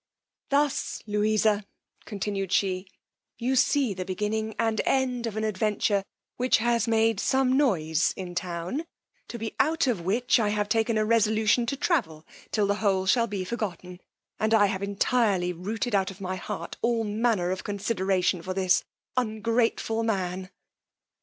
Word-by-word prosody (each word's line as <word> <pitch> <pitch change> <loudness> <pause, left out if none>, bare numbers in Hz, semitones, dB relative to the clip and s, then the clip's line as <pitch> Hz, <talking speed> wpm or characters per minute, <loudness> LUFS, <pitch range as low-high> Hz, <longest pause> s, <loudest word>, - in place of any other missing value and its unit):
Thus, 285 0 0
Louisa, 210 0 +2 0.4
continued 200 -2 -3
she, 190 -1 +1 0.5
you 255 +3 0
see 260 -2 +3
the 185 -1 -4
beginning 210 +4 -2
and 225 -1 +1
end 250 -3 0
of 220 -1 -5
an 220 - -1
adventure 210 -1 0 0.3
which 250 +1 +3
has 235 0 +1
made 225 -2 +2
some 265 +1 +2
noise 165 - +2
in 180 -2 -6
town, 180 - -3 0.4
to 235 - -6
be 225 -1 -5
out 320 +2 +3
of 235 -9 0
which 230 +9 +2
I 215 -2 +2
have 210 0 0
taken 225 0 +1
a 215 - +2
resolution 220 +1 +3
to 275 - -2
travel 205 - 0 0.2
till 210 -2 +1
the 200 +1 0
whole 190 -3 +2
shall 230 +5 +3
be 200 -3 -3
forgotten, 180 -5 -5 0.4
and 220 +1 +3
I 205 -2 +6
have 190 -1 -2
entirely 200 -2 +1
rooted 215 +7 -3
out 195 -2 +2
of 195 0 -10
my 185 -1 -3
heart 170 -2 -6
all 235 -1 +1
manner 210 -4 0
of 185 - -3
consideration 190 -3 0
for 185 +2 -5
this 185 -1 +3 0.3
ungrateful 225 -1 0
man. 190 -4 -2
215 Hz, 155 wpm, -27 LUFS, 190-230 Hz, 0.5 s, I